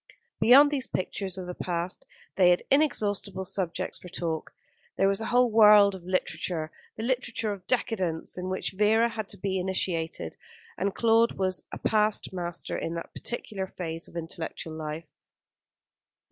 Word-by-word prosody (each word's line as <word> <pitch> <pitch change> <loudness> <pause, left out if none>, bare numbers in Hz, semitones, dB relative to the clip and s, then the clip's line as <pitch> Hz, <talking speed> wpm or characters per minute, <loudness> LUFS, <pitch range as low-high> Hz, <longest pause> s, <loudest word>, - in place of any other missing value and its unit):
Beyond 280 +5 +7
these 270 -4 -1
pictures 190 0 -3
of 185 - -5
the 180 - -5
past 175 0 -4 0.3
they 180 -2 +5
had 175 - +3
inexhaustible 205 -9 +1
subjects 185 -1 -3
for 180 - -11
talk. 165 -3 -3 0.5
There 195 - +4
was 195 +2 +1
a 220 - -3
whole 245 -1 +3
world 210 -2 +7
of 190 -2 -9
literature, 175 -3 -1 0.3
the 220 - -4
literature 235 -3 -1
of 190 -2 -11
decadence, 190 -10 -1
in 185 0 -4
which 185 - -2
Vera 215 +4 +3
had 220 -3 -5
to - - -7
be 190 0 -1
initiated, 175 - -2 0.4
and 195 +2 -2
Claude 230 0 +4
was 185 -1 -1
a - - -5
past 215 -2 +1
master 175 -2 -4
in 165 - -3
that 170 - -7
particular 205 -5 -4
phase 165 -2 -5
of - - -17
intellectual 165 -1 -5
life. 155 +1 -5
190 Hz, 160 wpm, -28 LUFS, 175-220 Hz, 0.5 s, Beyond